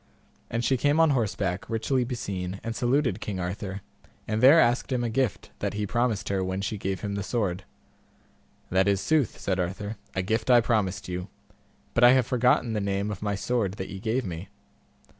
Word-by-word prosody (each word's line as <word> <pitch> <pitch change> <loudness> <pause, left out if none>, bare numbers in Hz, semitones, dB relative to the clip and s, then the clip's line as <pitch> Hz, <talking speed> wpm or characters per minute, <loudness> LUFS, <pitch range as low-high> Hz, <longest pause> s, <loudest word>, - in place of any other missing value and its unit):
And 115 0 -1
she 130 - +2
came 145 +5 +2
on 160 -2 +5
horseback, 100 -7 -1
richly 125 +3 0
beseen, 100 -7 -4
and 115 0 -4
saluted 125 -4 +1
King 100 -3 -4
Arthur, 95 +2 -4 0.5
and 110 0 -1
there 140 +6 +8
asked 120 0 +2
him 125 -2 0
a 115 - -1
gift 125 -3 -1
that - - -2
he 105 0 -1
promised 120 0 0
her 95 -1 0
when 95 +1 -2
she 100 +1 -3
gave 95 0 -3
him 100 -1 -3
the 100 - -2
sword. 95 -3 -2 1.1
That 95 +2 +3
is 100 -1 +3
sooth, 150 +1 +1
said 95 -1 -1
Arthur, 100 +4 -3 0.2
a 95 - 0
gift 110 +6 -1
I 125 -1 +8
promised 100 -5 0
you, 90 0 -4 0.7
but 120 - +2
I 120 +1 +9
have 130 -2 +3
forgotten 125 -1 +2
the 105 - -1
name 100 +1 -1
of 100 - -6
my 105 -1 -1
sword 100 -1 -1
that 95 -2 -6
ye 95 - -7
gave 115 +5 -1
me. 85 0 -6
105 Hz, 195 wpm, -27 LUFS, 95-120 Hz, 1.1 s, I